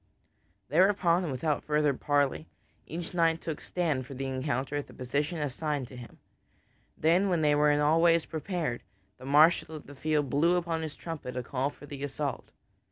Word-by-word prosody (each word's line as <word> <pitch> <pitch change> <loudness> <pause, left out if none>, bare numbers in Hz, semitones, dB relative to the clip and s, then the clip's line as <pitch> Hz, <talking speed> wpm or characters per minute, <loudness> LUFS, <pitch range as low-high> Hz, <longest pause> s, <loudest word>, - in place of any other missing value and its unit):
Thereupon 180 +1 +3
and 155 - -3
without 145 +3 -1
further 150 -1 +2
parley, 145 +2 0 0.4
each 170 +2 -5
knight 165 -2 +2
took 160 -2 -5
stand 155 -8 -1
for 135 - -8
the 135 +1 -4
encounter 135 +1 -2
at 145 - -3
the - - -15
position 145 +6 -2
assigned 145 -1 -2
to 130 - -11
him. 120 -1 -11 0.8
Then 175 +5 +3
when 170 -3 +1
they 150 -1 +4
were 150 0 +4
in 145 0 +3
all 155 +3 +3
ways 170 -1 +4
prepared, 160 -6 -3 0.4
the - - -10
marshal 155 +3 +4
of 150 - -9
the 145 - -11
field 150 +1 0
blew 165 +5 +3
upon 170 -2 -1
his 155 -2 -5
trumpet 150 -7 -6
a 125 - -2
call 130 +3 -1
for 145 - -13
the 140 -1 -7
assault. 145 0 -4
150 Hz, 185 wpm, -29 LUFS, 140-165 Hz, 0.8 s, they